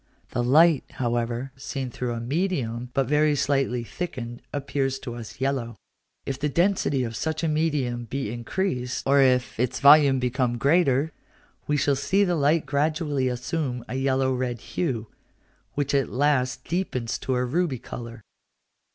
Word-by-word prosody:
This 120 - 0
light, 155 +4 +5
however, 120 +1 -2
seen 135 -1 -5
through 120 0 -3
a 115 - -4
medium 125 -4 -2
but 135 - +2
very 150 +2 +3
slightly 135 -4 0
thickened, 120 -5 -6
appears 135 -1 -1
to 125 -3 -7
us 120 +2 -9
yellow. 130 -4 -1 0.5
If 135 0 -3
the 150 +1 0
density 170 -5 +1
of 115 -2 -4
such 155 +5 -2
a - - +2
medium 145 -6 0
be 130 -1 -3
increased, 125 0 -2
or 140 +1 +5
if 125 -3 +2
its 125 +1 0
volume 140 -1 +7
become 125 -1 0
greater, 140 +1 +3 0.6
we 150 - +2
shall 140 0 +2
see 190 +9 +2
the 180 -3 +1
light 150 0 +2
gradually 145 -1 0
assume 125 0 -3
a - - -6
yellow 130 0 +1
red 125 -3 -2
hue, 125 -11 -1 0.7
which 145 -1 -1
at 140 -2 +2
last 130 -1 +1
deepens 155 -10 -2
to 130 - -1
a 125 0 +1
ruby 150 +1 0
colour. 115 -1 -8
135 Hz, 155 wpm, -25 LUFS, 125-150 Hz, 0.7 s, volume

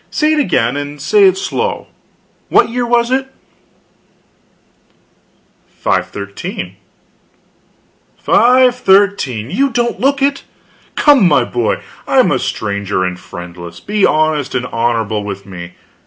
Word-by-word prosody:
Say 310 0 +1
it 310 - +1
again 140 - +1
and 145 0 -6
say 415 - +4
it 380 - +4
slow. 460 +4 -3 0.6
What - - +4
year 240 +1 -2
was 235 0 +1
it?" 265 +1 0 2.5
"513." - - -3 1.4
"513! 200 - +3
You 275 +8 +1
don't 240 -1 -1
look 275 +1 +1
it! 280 0 0 0.5
Come, 280 - +5
my 145 -6 +3
boy, 120 -2 -2 0.2
I - - +1
am - - +5
a - - +1
stranger 100 -2 -2
and 90 -1 -3
friendless; 85 -1 -10
be 210 0 -2
honest 155 -2 +1
and 125 - -1
honorable 115 -3 -1
with 100 -1 -6
me. 90 -2 -9
155 Hz, 120 wpm, -15 LUFS, -, 2.5 s, Come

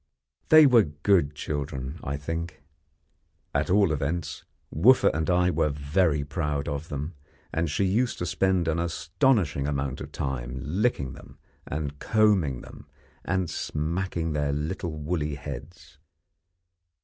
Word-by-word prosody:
They 155 -1 +9
were 125 -4 +7
good 75 0 +1
children, 70 0 -4
I 70 +1 -3
think. 80 0 -5 0.9
At - - 0
all 100 -2 +4
events, 75 0 -2 0.3
Wooffa 120 - +6
and 80 0 -1
I 90 0 +3
were 75 -1 +1
very 75 +2 +1
proud 75 -2 -2
of 70 +3 -4
them, 75 +3 -4 0.4
and 80 +2 0
she 75 - 0
used 115 +6 +1
to 90 - -3
spend 90 0 +1
an 80 0 +1
astonishing 85 - +1
amount 70 -2 -2
of - - -7
time 65 -2 -4
licking 75 - 0
them, - - -14 0.3
and 75 0 -4
combing 100 - +2
them, - - -13 0.4
and 95 -1 0
smacking 80 +2 -2
their 75 -1 0
little 80 +5 -3
woolly 75 -1 -2
heads. 70 +1 -9
75 Hz, 135 wpm, -26 LUFS, 70-90 Hz, 0.9 s, They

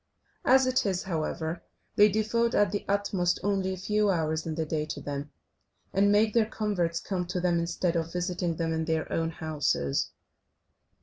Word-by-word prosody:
As 265 0 +6
it 255 0 +2
is, 190 -3 -1
however, 160 -1 -3 0.3
they 210 +1 +7
devote 220 +3 +1
at 205 -3 +3
the 205 - -2
utmost 195 -3 +1
only 195 -1 0
a 190 - -4
few 210 +3 +1
hours 160 -3 0
in 160 - -2
the 160 0 -1
day 155 0 -1
to - - -5
them, 145 0 -5 0.6
and 200 +1 +4
make 210 +1 +3
their 230 -2 +3
converts 190 -7 -1
come 180 -3 -3
to 180 +1 -2
them, 175 -1 +2
instead 170 +1 -1
of 165 0 -1
visiting 180 -1 -1
them 165 0 -1
in 160 0 -1
their 160 -1 -1
own 165 0 0
houses. 150 - -1
180 Hz, 180 wpm, -28 LUFS, 160-205 Hz, 0.6 s, they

